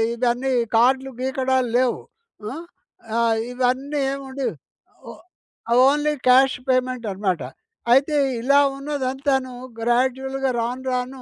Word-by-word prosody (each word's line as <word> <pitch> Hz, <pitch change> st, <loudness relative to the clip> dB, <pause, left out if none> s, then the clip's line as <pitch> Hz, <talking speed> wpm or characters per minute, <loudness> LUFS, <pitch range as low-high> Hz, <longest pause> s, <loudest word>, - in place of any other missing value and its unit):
ఇవన్నీ 245 Hz, +2 st, 0 dB, 0.3 s
కార్డ్‌లు 265 Hz, +3 st, +3 dB
గీకడాలు 260 Hz, -1 st, 0 dB
లేవు. 255 Hz, -2 st, +1 dB, 0.5 s
హ్మ్. 275 Hz, +10 st, -6 dB, 0.6 s
ఆహ్, 230 Hz, -1 st, +2 dB, 0.2 s
ఇవన్నీ 260 Hz, +4 st, -1 dB
ఏముండేవి 270 Hz, -1 st, -4 dB, 0.6 s
ఓ -, -, -6 dB, 0.8 s
ఓన్లీ 295 Hz, +2 st, +2 dB
క్యాష్ 260 Hz, +2 st, +5 dB
పేమెంట్ 255 Hz, -2 st, 0 dB
అనమాట. 190 Hz, -5 st, -1 dB, 0.5 s
అయితే 285 Hz, +3 st, +3 dB, 0.3 s
ఇలా 280 Hz, +3 st, +4 dB, 0.2 s
ఉన్నదంతాను 270 Hz, -2 st, -2 dB, 0.3 s
గ్రాడ్యువల్‌గా 265 Hz, +3 st, 0 dB
రాను, 245 Hz, +3 st, -3 dB
రాను 255 Hz, +1 st, -3 dB
260 Hz, 100 wpm, -22 LUFS, 250-270 Hz, 0.8 s, క్యాష్